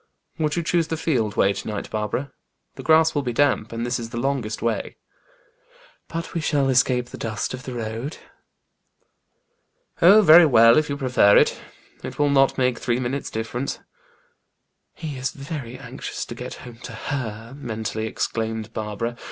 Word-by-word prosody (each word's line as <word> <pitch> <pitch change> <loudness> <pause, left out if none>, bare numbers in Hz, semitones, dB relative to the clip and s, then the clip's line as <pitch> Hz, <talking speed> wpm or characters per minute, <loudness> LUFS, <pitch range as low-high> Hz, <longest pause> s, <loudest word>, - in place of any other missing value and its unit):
"Would 150 -1 0
you 170 - -1
choose 165 0 +1
the 160 - -3
field 115 -11 0
way 100 - +4
to - - -7
night, 105 -2 -5
Barbara? 110 +6 -2 0.4
The - - -9
grass 160 0 +4
will 145 - 0
be 125 -3 -3
damp, 140 -4 +2
and 115 +1 -3
this 120 0 -1
is 115 -1 -6
the 115 - -6
longest 120 -4 -2
way." 115 -1 -2 1.1
"But 165 0 -5
we 170 - -1
shall 145 -3 +1
escape 125 -1 +2
the - - -10
dust 110 +1 -3
of 130 - -6
the 125 -1 -7
road." 115 +6 -4 1.8
"Oh, 200 +5 +8
very 165 -1 +9
well, 115 -1 +7
if 155 0 -2
you 140 - -2
prefer 125 -7 +4
it. - - +3 0.4
It - - -7
will 145 -1 +2
not 135 -1 +3
make 125 -2 +1
three 120 0 0
minutes' 130 +3 -3
difference." 115 +4 -3 1.2
"He 150 -4 -6
is 130 - -1
very 140 -4 -7
anxious - - -6
to - - -7
get - - -7
home 120 -2 -11
to 125 - -9
her!" 115 -1 -5
mentally 110 -4 -4
exclaimed 110 0 -3
Barbara. 110 +2 -4
125 Hz, 170 wpm, -23 LUFS, 115-145 Hz, 1.8 s, very